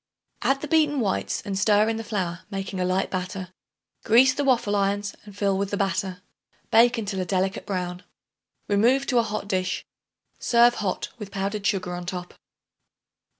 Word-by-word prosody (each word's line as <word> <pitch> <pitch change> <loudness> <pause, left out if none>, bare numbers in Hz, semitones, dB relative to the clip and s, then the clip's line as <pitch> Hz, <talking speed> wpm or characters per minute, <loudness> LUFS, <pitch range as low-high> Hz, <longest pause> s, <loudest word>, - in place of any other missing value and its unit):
Add 270 0 +1
the 300 - -4
beaten 300 -2 +3
whites 205 -5 -1
and 200 -2 -3
stir 205 +2 +4
in 225 0 0
the 225 - -4
flour, 185 -6 -2
making 195 -1 -4
a 180 - +1
light 185 +1 0
batter. 185 0 -4 0.5
Grease 255 +4 +6
the 285 - -1
waffle 240 -6 +2
irons 200 0 0
and 205 -1 -13
fill 200 -1 +1
with 200 0 -1
the 200 - -2
batter. 190 -1 -1 0.5
Bake 235 +2 +5
until 205 -3 -3
a - - -2
delicate 190 +2 -1
brown. 180 -2 -3 0.7
Remove 240 +7 +3
to 250 -3 +2
a - - +5
hot 215 -2 -4
dish. 185 -2 -1 0.5
Serve 240 0 +5
hot 195 -6 -2
with 210 -2 -7
powdered 200 +1 -2
sugar 185 -4 -1
on 175 0 -6
top. 180 -1 -5
200 Hz, 175 wpm, -25 LUFS, 185-225 Hz, 0.7 s, Grease